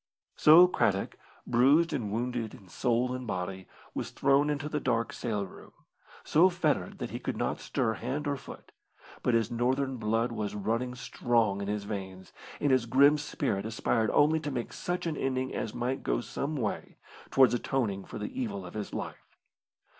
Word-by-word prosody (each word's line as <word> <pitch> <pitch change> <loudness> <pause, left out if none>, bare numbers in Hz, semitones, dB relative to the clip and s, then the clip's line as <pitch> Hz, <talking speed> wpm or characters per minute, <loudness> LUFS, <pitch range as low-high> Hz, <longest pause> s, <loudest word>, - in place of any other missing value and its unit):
So 165 +4 +8
Craddock, 100 - 0 0.3
bruised 140 +8 +4
and 115 -8 -2
wounded 120 0 -2
in 95 -3 -16
soul 125 +5 0
and 130 -1 -5
body, 95 -1 -4 0.3
was - - -3
thrown 140 +2 +3
into 145 0 -2
the 150 0 -2
dark 115 -4 0
sail 105 -4 -2
room, 95 - -14 0.5
so 170 +5 +5
fettered 155 - -1
that - - -5
he - - -4
could - - -3
not - - -1
stir 110 - -1
hand 130 +7 -3
or 140 - 0
foot, 135 - -11 0.5
but 125 - +2
his 115 0 +1
Northern 130 +3 0
blood 115 +2 0
was 105 -3 -3
running 115 +5 -1
strong 115 -5 0
in 100 - -4
his 105 0 -2
veins, 95 -3 -7 0.3
and 145 - +2
his 130 -3 +3
grim 140 +5 +5
spirit 100 -8 -2
aspired 110 0 0
only 155 +2 +4
to 150 -1 -4
make 125 -4 -4
such 175 0 -3
an 165 -2 -1
ending 130 0 -1
as 110 - -3
might 130 +3 -2
go - - 0
some 140 +5 -4
way 115 -7 -3 0.3
towards 130 -2 +5
atoning 115 -5 -1
for - - -8
the 265 -1 -4
evil 200 -5 -4
of - - -9
his 105 -1 -5
life. - - -7
125 Hz, 180 wpm, -29 LUFS, 110-140 Hz, 0.5 s, So